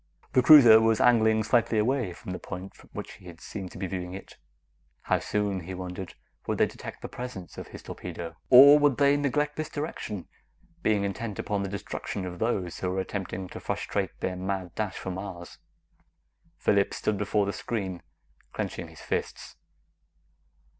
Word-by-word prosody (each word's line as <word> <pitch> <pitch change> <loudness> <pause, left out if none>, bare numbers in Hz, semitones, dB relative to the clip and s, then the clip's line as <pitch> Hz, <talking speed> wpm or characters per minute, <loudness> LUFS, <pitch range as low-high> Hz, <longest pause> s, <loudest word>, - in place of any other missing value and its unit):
The 130 - +5
cruiser 120 -6 +9
was 110 -1 +3
angling 110 -2 +4
slightly 115 -1 +2
away 120 -2 +1
from 90 - -8
the 90 - -4
point 95 +1 -7
from - - -19
which - - -7
he 90 -1 -11
seemed 95 +1 -7
to - - -10
be 95 - -3
viewing 90 0 -4
it. 95 - -10 0.7
How - - +1
soon, 105 -2 -1
he 90 +2 -7
wondered, 90 0 -6 0.3
would - - 0
they - - +5
detect - - -9
the - - -3
presence 125 -8 -7
of - - -8
his - - -11
torpedo? 85 -1 -7
Or 140 +4 +10
would 145 -3 +3
they 140 0 +5
neglect 145 +1 0
this 155 - -3
direction, 115 - -5 0.5
being 105 -6 +2
intent 100 +1 -3
upon 105 -1 -1
the 100 - -3
destruction 100 0 -5
of 90 -1 -7
those 95 -6 -1
who 90 - -1
were 95 +1 -1
attempting 95 -1 -4
to - - -8
frustrate - - -3
their 90 - -1
mad 95 -1 -3
dash 105 -3 -3
for 95 - -4
Mars? 90 -2 -7 1.0
Phillips 100 -1 +2
stood 105 -2 -1
before 105 0 +1
the 100 - -2
screen, 95 -6 -4 0.5
clenching - - -4
his - - -14
fists. - - -4
100 Hz, 175 wpm, -28 LUFS, 95-115 Hz, 1.0 s, Or